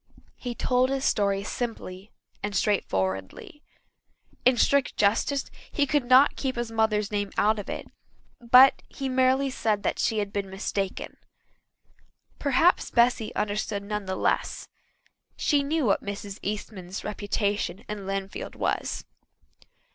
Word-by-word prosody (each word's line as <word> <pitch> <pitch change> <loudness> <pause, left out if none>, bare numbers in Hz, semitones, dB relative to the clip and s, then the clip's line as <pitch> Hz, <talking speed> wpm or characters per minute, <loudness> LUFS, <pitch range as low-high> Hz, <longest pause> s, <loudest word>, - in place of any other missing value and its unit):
He 245 -1 -5
told 255 +1 +2
his 270 0 -1
story 200 -1 +1
simply 205 -3 -5 0.3
and 205 0 -3
straightforwardly. 95 - -1 0.8
In 255 0 +5
strict 280 +3 +2
justice 225 +7 +1 0.2
he 290 - +2
could 285 -2 +1
not 255 +3 +6
keep 265 -2 -2
his 240 -1 -3
mother's 220 -1 +1
name 205 -1 -1
out 215 +1 +3
of 205 - -7
it, - - -5 0.5
but 250 +3 +7
he 275 - -4
merely 260 +1 +2
said 215 -4 0 0.2
she 220 - +1
had 205 -1 -2
been 200 -1 -2
mistaken. 195 0 -4 1.2
Perhaps 290 +5 +3
Bessy 235 -2 +2
understood 205 -1 -2
none 210 0 -4
the 190 - -2
less. - - -1 0.7
She 290 -2 +2
knew 295 +1 0
what 200 - +2
Mrs. 200 0 -6
Eastman's 195 -2 -5
reputation 205 -1 -2
in 205 -2 -6
Lynnfield 195 0 -4
was. - - -2
215 Hz, 130 wpm, -26 LUFS, 200-255 Hz, 1.2 s, but